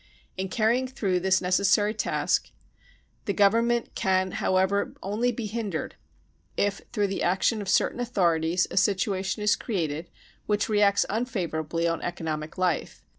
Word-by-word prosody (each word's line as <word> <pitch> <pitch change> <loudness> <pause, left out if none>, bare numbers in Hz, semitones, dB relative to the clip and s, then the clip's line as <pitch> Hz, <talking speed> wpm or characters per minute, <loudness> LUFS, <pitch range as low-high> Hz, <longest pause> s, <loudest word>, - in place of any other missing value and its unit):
In 190 0 -3
carrying 235 +5 +1
through 200 -8 -1
this 190 +1 +2
necessary 200 +3 +2
task 215 - 0 0.8
the 200 - 0
Government 230 +4 +2
can 190 -3 +1
how 185 - 0
ever 195 +2 +1
only 220 +5 0
be 235 -1 -5
hindered, 210 -6 -3 0.6
if 200 -1 0
through 210 -4 +1
the 195 -1 -3
action 190 +5 +1
of 195 - -5
certain 190 - +2
authorities 175 -7 +1
a - - -5
situation 195 +1 +1
is 210 0 +4
created 165 - -3 0.4
which 210 -1 +1
reacts 205 -2 +3
unfavour 200 -8 -2
ably 165 +2 -1
on 165 -1 -1
economic 155 -2 -4
life. 180 -3 -1
195 Hz, 145 wpm, -26 LUFS, 180-215 Hz, 0.8 s, is